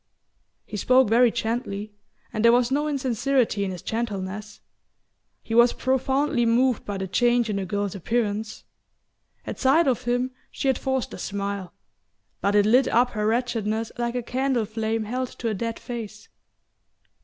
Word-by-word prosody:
He 210 - -6
spoke 255 +3 +4
very 240 +2 +5
gently, 220 -3 -3 0.4
and 215 - -1
there 235 - +7
was 245 +1 +3
no 295 +2 +1
insincerity 260 -5 0
in 195 - -1
his 180 -3 -7
gentleness. 210 -2 -4 0.8
He 225 - -5
was 235 +1 +6
profoundly 265 +1 +1
moved 240 +1 +2
by 205 -1 -3
the 190 0 -3
change 240 +3 +2
in 200 - -1
the 195 - -2
girl's 200 0 -2
appearance. 215 +2 -2 0.8
At - - -6
sight 290 +6 +4
of 250 -4 0
him 245 +1 0 0.2
she - - -3
had 265 - +1
forced 265 -2 -2
a - - -8
smile; 200 -2 -4 0.7
but 200 +1 +1
it 205 -1 +5
lit 250 +5 +4
up 245 +1 +3
her 210 -1 -1
wretchedness 225 -2 -1
like 240 0 -1
a 245 - -1
candle 255 -1 0
flame 220 +1 -2
held 250 +4 -2
to 230 - -2
a - - -1
dead 230 +3 -3
face. 220 -3 -7
230 Hz, 165 wpm, -25 LUFS, 210-250 Hz, 0.8 s, there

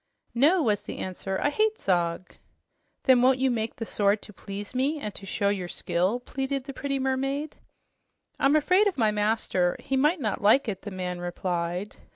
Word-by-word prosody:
"No," 305 +9 +4
was 210 -5 +1
the - - -7
answer. 190 +1 -4
"I 290 - +1
hate 435 +5 +1
Zog." 175 -1 0 0.7
"Then 255 -2 +5
won't 255 +1 +5
you 265 0 +2
make 225 -1 -2
the 225 - -5
sword 205 -1 +1
to 210 - -13
please 200 +3 -7
me 275 +5 0
and 210 -7 -5
to 195 - -7
show 200 +1 0
your 190 -3 -2
skill?" 185 +6 -1
pleaded 270 +1 -3
the 275 +1 -7
pretty 275 +1 -2
mermaid. 270 +3 -2 0.8
"I'm 275 +2 +4
afraid 365 +7 +4
of 390 - -1
my 220 -4 +3
master. 210 -4 +1
He 270 - -3
might 300 +6 +3
not 215 -7 -2
like 220 +6 +4
it," 195 -3 -3
the 205 - -6
man 180 -2 -4
replied. 175 +1 -3
225 Hz, 190 wpm, -27 LUFS, 195-275 Hz, 0.8 s, Then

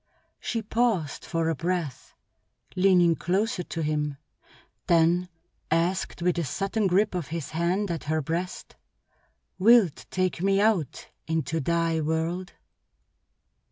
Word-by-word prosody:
She 230 -2 -3
paused 215 -9 0
for 165 -1 -1
a 165 - +2
breath, 165 -2 -3 0.6
leaning 180 -3 +4
closer 190 +4 0
to 165 -1 -4
him, 150 -2 -1 0.7
then 170 +2 +3 0.4
asked 170 +2 0
with 175 -1 +1
a - - 0
sudden 195 - -1
grip 195 +3 +2
of 175 -5 -3
his 160 -3 -5
hand 175 +5 0
at 165 - -4
her 155 +1 0
breast: 170 +5 -4 0.8
"Wilt 215 -5 +4
take 185 -2 -1
me 195 +1 +3
out 200 - 0 0.2
into 160 -1 -1
thy 165 +1 0
world?" 165 +4 -2
170 Hz, 120 wpm, -26 LUFS, 160-190 Hz, 0.8 s, leaning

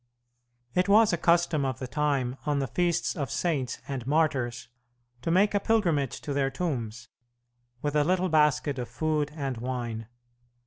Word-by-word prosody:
It 180 +2 +1
was 215 -1 +6
a - - +4
custom 170 -3 +2
of 130 -3 -1
the 130 - -5
time 135 -2 0
on 145 -1 +1
the 140 - 0
feasts 170 +6 0
of 140 -7 -3
saints 140 -7 -1
and 130 -3 -5
martyrs 140 -6 0 0.5
to 165 - -3
make 195 +5 +3
a 205 - +3
pilgrimage 170 - +1
to 145 - -4
their 135 -1 +1
tombs, 125 -8 -4 0.7
with 145 0 -1
a 150 - +4
little 185 +3 +1
basket 150 -3 +2
of 120 - -4
food 155 -2 -1
and 135 -5 -3
wine. 120 -2 -4
145 Hz, 165 wpm, -28 LUFS, 130-170 Hz, 0.7 s, was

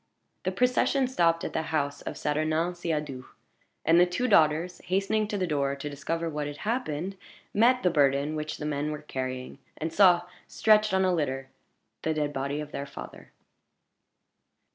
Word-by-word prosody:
The 185 - +1
procession 250 +5 +2
stopped 170 -9 +2
at - - -4
the 160 - 0
house 145 -3 -1
of - - -6
Saturnin 155 +3 0
Siadoux; 150 -7 -3 0.6
and 165 +1 +6
the 180 - +6
two 180 +9 -1
daughters, 160 0 +3
hastening 195 +3 +1
to 205 - -2
the 185 - 0
door 140 -4 0
to 140 +1 -5
discover 165 +4 -3
what 150 -2 -3
had 145 0 -6
happened, 195 - -2 0.4
met 245 +4 +4
the 180 - +3
burden 140 0 +2
which 155 0 -4
the 150 - -5
men 150 0 -1
were 150 0 -6
carrying, 130 -2 -5 0.2
and 160 +1 -3
saw, 180 -3 +6 0.2
stretched 215 -1 +4
on 190 0 +3
a 185 - +2
litter, 135 -5 -2 0.5
the 160 0 -1
dead 150 -1 -1
body 140 +2 -2
of 150 -1 -6
their 140 - -5
father. - - -10
155 Hz, 170 wpm, -28 LUFS, 145-185 Hz, 0.6 s, and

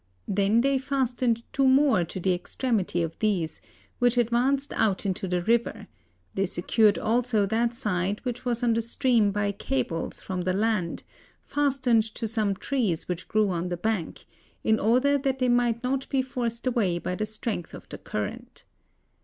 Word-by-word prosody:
They 195 0 +1
then 265 +5 +3
fastened 250 -3 0
two 270 -1 +3
more 265 -7 +4
to 170 - -6
the 185 +1 +1
extremity 190 -2 -1
of 165 0 -5
these, 185 -8 -1 0.4
which 245 0 +3
advanced 250 +4 +1
out 205 -2 +1
into 190 0 -2
the 180 -1 -1
river; 225 -1 0 0.5
they 195 0 0
secured 210 +4 +2
also 230 -2 +1
that 230 +3 0
side 205 -4 -1
which 245 -1 -3
was 245 -1 -1
on 235 -1 +3
the 230 - +1
stream 235 -2 +2
by 205 0 0
cables 165 -3 -2
from 185 -1 -4
the 185 +1 0
land, 205 -4 -1 0.4
fastened 265 -5 +2
to 230 - -3
some 215 -3 0
trees 215 - -1
which 180 0 -4
grew 215 -1 +2
on 175 0 -2
the 175 - -3
bank, 210 -3 -3 0.4
in 220 0 +3
order 255 +6 +3
that 270 -1 -1
they 255 -1 +1
might 240 -1 +2
not 265 +1 -1
be 270 -2 +1
forced 240 -2 -4
away 225 -9 +1
by 175 - -3
the 215 +3 -2
strength 215 -4 -4
of - - -12
the - - -8
current. - - -6
225 Hz, 170 wpm, -26 LUFS, 190-250 Hz, 0.5 s, more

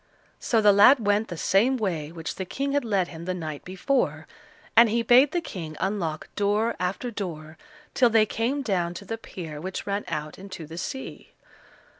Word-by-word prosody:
So 225 -2 +1
the 205 -1 +6
lad 220 +4 +6
went 205 +2 +2
the 175 - -6
same 230 +11 +3
way 165 -9 -2
which 165 -1 -5
the 190 - -5
King 275 +9 -3
had 285 0 +1
led 200 -6 0
him 165 0 -9
the 185 0 -2
night 155 -4 -6
before, 180 - -1 0.5
and 230 0 +8
he 230 +2 +1
bade 250 +5 +6
the 350 - 0
King 160 - -7
unlock 185 -6 -2
door 210 +3 +1
after 190 +7 -2
door 160 -7 -6 0.4
till 245 -2 +4
they 220 -1 +4
came 245 +7 -1
down 180 -6 -1
to 200 - -8
the 225 +3 -5
pier 160 -8 -8
which 185 +2 -5
ran 200 0 -2
out 150 +1 -5
into 185 -4 -8
the 165 +3 -8
sea. 265 +9 -7
195 Hz, 190 wpm, -26 LUFS, 170-230 Hz, 0.5 s, and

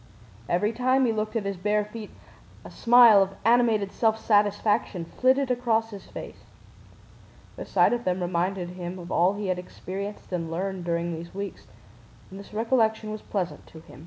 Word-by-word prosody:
Every 205 +6 +1
time 255 +3 +2
he 235 - +2
looked 215 +1 -3
at 220 -3 -1
his 200 -1 -3
bare 210 +3 0
feet 210 0 -9 0.6
a - - -10
smile 235 -4 +7
of 195 0 -1
animated 225 -4 +3
self 220 -1 +1
satisfaction 205 -3 +1
flitted 260 +7 +1
across 230 -2 0
his 200 -2 -10
face. - - -9 1.1
The - - -8
sight - - +3
of 240 0 -2
them 185 -2 0
reminded 180 +1 -1
him 180 0 -6
of 175 0 -9
all 180 +3 +3
he 205 0 -4
had 180 -1 0
experienced 195 +3 -7
and 170 -3 -3
learned 185 +1 -3
during 170 0 -1
these 170 +2 -8
weeks 200 0 -6 0.6
and 195 - -9
this 200 - -12
recollection 220 -1 +1
was 215 0 -6
pleasant 185 -4 -4
to 160 - -13
him. 135 - -15
205 Hz, 175 wpm, -26 LUFS, 180-225 Hz, 1.1 s, smile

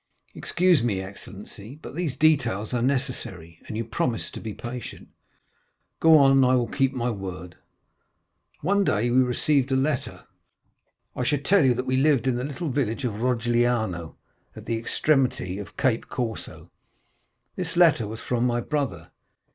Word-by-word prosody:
"Excuse 180 -4 +2
me, 110 -5 0
excellency, 100 +4 -9
but - - -10
these 155 -5 -3
details 125 -9 +2
are 120 - 0
necessary, 120 - -3
and 110 - -5
you 115 - -1
promised 115 +1 -2
to - - -6
be 110 - -6
patient." 120 +2 -8 0.9
"Go 160 -1 +7
on; 135 -1 +5
I 130 0 +4
will 125 -1 +2
keep 135 +2 0
my 125 -2 -1
word." 90 -4 -7 1.1
"One 200 +5 +2
day 120 - +1
we 125 - +4
received 130 +2 +1
a - - +3
letter. 135 0 -1 0.9
I - - -2
should 145 +2 0
tell 200 -3 +5
you 130 -2 +4
that 125 +2 -3
we 130 0 0
lived 135 -3 +3
in 130 -2 +1
the 125 - -2
little 150 +4 -4
village 130 -2 -1
of 110 -2 -3
Rogliano, 120 -7 0 0.4
at - - -10
the 115 - -1
extremity 125 -5 0
of 100 - -9
Cap 125 -5 +1
Corse. 115 -3 -3 1.1
This 175 -1 -2
letter 160 -11 +5
was 110 +2 -7
from 120 -1 -1
my 120 0 0
brother. 125 - -3
125 Hz, 160 wpm, -25 LUFS, 115-140 Hz, 1.1 s, Go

